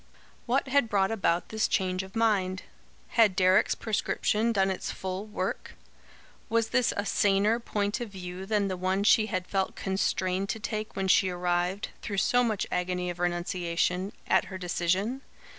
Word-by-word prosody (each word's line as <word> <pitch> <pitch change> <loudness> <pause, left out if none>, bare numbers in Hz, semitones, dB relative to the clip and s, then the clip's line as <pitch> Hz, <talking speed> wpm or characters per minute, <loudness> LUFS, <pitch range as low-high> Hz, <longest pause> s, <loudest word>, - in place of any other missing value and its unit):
What 265 +3 +1
had 265 -3 +2
brought 195 -1 +2
about 180 -5 0
this 220 0 0
change 185 -2 0
of 190 +2 -11
mind? 195 -5 +1 0.5
Had 220 -5 +4
Deryck's 185 +2 +4
prescription 220 +1 0
done 195 -3 +2
its 190 - -4
full 190 +2 -5
work? 195 -3 -4 0.7
Was 230 0 +1
this 250 0 +2
a 205 - -1
saner 205 +3 +2
point 205 0 -2
of 235 - -4
view 185 -1 -7
than 210 -2 +1
the 185 -1 -3
one 185 +2 0
she 215 +1 +5
had 185 -3 -2
felt 190 0 -1
constrained 190 0 -1
to 225 - -2
take 215 -1 -4
when 195 0 -1
she 190 0 +4
arrived, 180 +2 -1
through 200 -3 -4
so 245 +5 +3
much 220 -4 0
agony 180 0 -1
of 175 - -10
renunciation, 175 +1 -1
at - - +3
her 190 - -7
decision? 185 +7 -1
195 Hz, 165 wpm, -28 LUFS, 185-215 Hz, 0.7 s, she